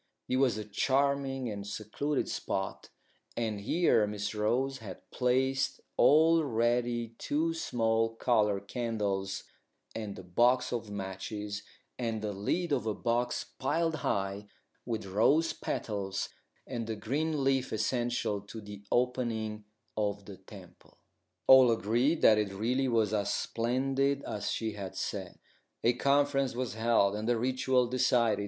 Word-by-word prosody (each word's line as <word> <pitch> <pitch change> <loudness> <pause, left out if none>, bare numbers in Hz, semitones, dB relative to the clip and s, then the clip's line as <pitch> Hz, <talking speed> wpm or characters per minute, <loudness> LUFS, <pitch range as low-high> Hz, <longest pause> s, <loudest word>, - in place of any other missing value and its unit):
It 130 - +1
was 130 -5 +3
a 105 - -5
charming 135 +4 0
and 100 -2 -5
secluded 110 +8 -2
spot, 95 0 -3 0.5
and 110 -3 -1
here 115 - +3
Miss 105 0 -3
Rose 125 +6 0
had 100 -5 -10
placed 130 +2 +1 0.2
all 160 +2 +5
ready 120 -2 0
two 160 +3 0
small 115 -7 0
coloured 105 -4 +1
candles 100 -5 -2 0.5
and 105 -3 -5
a 95 - -8
box 120 +9 +2
of 115 -3 -3
matches, 100 +1 -5 0.4
and 115 -3 -2
the 105 -1 -2
lid 150 - -1
of 115 -6 0
a 110 - 0
box 120 0 -1
piled 165 +4 0
high 100 -5 -2 0.4
with 110 -4 -2
rose 140 - +3
petals, 100 -3 -3 0.4
and 120 -3 -4
the 110 - -2
green 145 +6 -1
leaf 135 -1 +1
essential 120 -2 -1
to 105 +3 -9
the 105 -1 -9
opening 115 -4 0 0.3
of 100 -2 -1
the 100 -2 -10
temple. 95 -2 -15 0.5
All 130 -2 +8
agreed 120 +8 +1
that 110 -1 +7
it 105 -2 -1
really 120 +7 0
was 110 -4 +2
as 105 -2 0
splendid 135 +4 0
as 105 -1 -3
she 110 -1 -1
had 100 -2 -7
said. - - -4 0.5
A 120 - +4
conference 140 0 +2
was 125 -3 -2
held, 110 -3 +2
and 110 +2 -2
the 120 - +3
ritual 130 +1 +2
decided. 120 -3 +2
115 Hz, 140 wpm, -31 LUFS, 105-130 Hz, 0.5 s, All